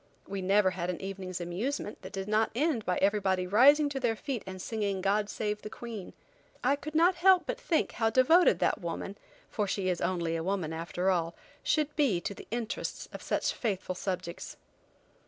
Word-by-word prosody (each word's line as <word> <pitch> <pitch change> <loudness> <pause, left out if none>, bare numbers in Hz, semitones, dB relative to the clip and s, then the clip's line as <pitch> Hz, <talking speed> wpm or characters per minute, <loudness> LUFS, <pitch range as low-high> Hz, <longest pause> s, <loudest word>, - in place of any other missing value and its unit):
We 195 0 -4
never 195 +1 +3
had 175 -1 -3
an 180 - -3
evening's 190 -2 -5
amusement 205 +7 -3
that - - -9
did 195 -1 -4
not 215 +1 +2
end 270 - 0
by 180 - +1
everybody 195 -2 +2
rising 275 +10 +6
to 275 -1 -3
their 240 -3 +1
feet 245 0 -4
and 185 0 -6
singing 200 -1 -2
"God 205 +2 +1
Save 210 0 -2
the 215 - -7
Queen." 225 -4 -7 0.5
I 270 +3 +4
could 305 +2 -8
not 345 +4 +5
help 365 +1 +5
but - - -4
think 325 - +1
how 225 -1 +1
devoted 260 - +5
that - - +1
woman, 170 +3 -4 0.3
for 210 -2 -2
she 190 -1 -1
is 180 - -1
only 170 -3 0
a 165 - -2
woman 180 -4 -1
after 175 +3 -1
all, 170 -2 -1 0.3
should 305 -1 0
be 270 - +2
to 200 - -4
the - - -12
interests 235 0 -4
of - - -7
such - - 0
faithful 195 -5 -2
subjects. 180 -2 -5
205 Hz, 190 wpm, -30 LUFS, 185-250 Hz, 0.5 s, rising